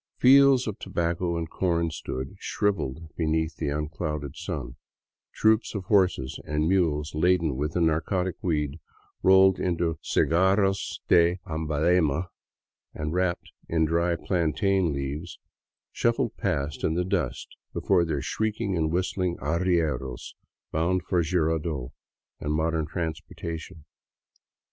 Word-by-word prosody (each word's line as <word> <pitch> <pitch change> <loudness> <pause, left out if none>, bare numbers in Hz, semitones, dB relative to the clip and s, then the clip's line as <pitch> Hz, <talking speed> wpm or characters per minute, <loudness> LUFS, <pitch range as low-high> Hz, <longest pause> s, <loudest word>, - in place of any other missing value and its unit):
Fields 135 0 +6
of 105 -3 -4
tobacco 85 -2 -1
and 80 -1 -4
corn 85 -3 0
stood 65 -3 -5
shriveled 85 -6 -2
beneath 80 0 0
the 75 - -2
un 75 +1 -2
clouded 75 -3 -4
sun; - - -5 0.6
troops 110 +1 +2
of 100 - -3
horses 95 -9 +1
and 75 +1 -1
mules 80 -5 +1
laden 85 -2 +2
with 75 +4 -2
the 90 - 0
narcotic 85 +3 +1
weed, 75 -3 -1 0.4
rolled 95 0 +6
into 85 -2 -1
cigarros 95 +3 +1
de 85 +1 +4
Amhalema 80 +1 +1 0.7
and 75 +1 -3
wrapped 90 -1 -1 0.2
in 80 -1 +2
dry 85 +2 +1
plantain 90 +1 +1
leaves, 70 +5 -4 0.5
shuffled - - 0
past 70 +2 -2
in 80 - +1
the 90 +1 0
dust 95 - -2 0.2
before 95 -3 +2
their 75 -5 -2
shrieking 110 -2 -1
and 80 -2 0
whistling 90 0 -1
arrieros, 80 -3 -1 0.4
bound 85 +3 +1
for 90 0 +1
Jirardot 80 -5 -1 0.5
and 75 - -2
modern 80 0 0
transportation. 80 -1 -5
85 Hz, 120 wpm, -26 LUFS, 75-90 Hz, 0.7 s, Fields